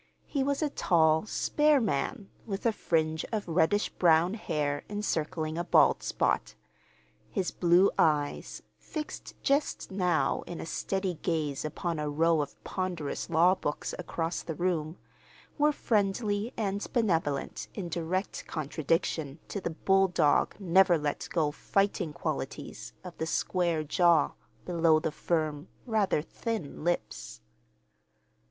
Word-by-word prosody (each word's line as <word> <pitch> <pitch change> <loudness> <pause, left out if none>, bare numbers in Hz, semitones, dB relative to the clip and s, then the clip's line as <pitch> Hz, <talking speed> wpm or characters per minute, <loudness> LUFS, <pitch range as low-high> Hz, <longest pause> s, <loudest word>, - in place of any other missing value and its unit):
He 280 - -2
was 280 +2 0
a 295 - 0
tall, 160 - +3
spare 295 +4 +3
man, 200 - -2 0.2
with 195 0 -4
a 230 - +5
fringe 160 -5 0
of 215 -4 -2
reddish 175 +5 +2
brown 170 +1 +3
hair 145 -9 -2
encircling 165 -5 -2
a - - 0
bald - - +4
spot. - - 0 0.7
His 190 -4 -1
blue 175 +2 +4
eyes, 150 -2 +1 0.2
fixed 305 -1 -7
just 280 -5 0
now 180 -4 +1
in 175 - -6
a - - -5
steady 190 0 -2
gaze 150 -5 -1
upon 160 +2 -3
a 150 0 -1
row 160 +1 +3
of 145 -1 -7
ponderous 180 -6 -3
law 170 +3 +5
books 150 -6 -3
across 165 -1 -3
the 160 - -5
room, 170 -1 -1 0.6
were 300 +1 +5
friendly 210 -2 0
and 200 -2 -1
benevolent 165 - 0
in 195 -5 -4
direct 170 +3 -3
contradiction 155 -1 -1
to 200 - -4
the - - -2
bulldog, 185 -2 +2
never 185 -1 +5
let 150 -1 -3
go 155 -4 +1
fighting 195 0 0
qualities - - -5
of 180 -2 -9
the 160 - -1
square 170 -2 0
jaw 165 0 +3 0.3
below 165 -3 +3
the 155 - -2
firm, 155 -2 -1 0.2
rather 210 - +1
thin 215 -8 -5
lips. 170 - -2
175 Hz, 130 wpm, -29 LUFS, 155-195 Hz, 0.7 s, a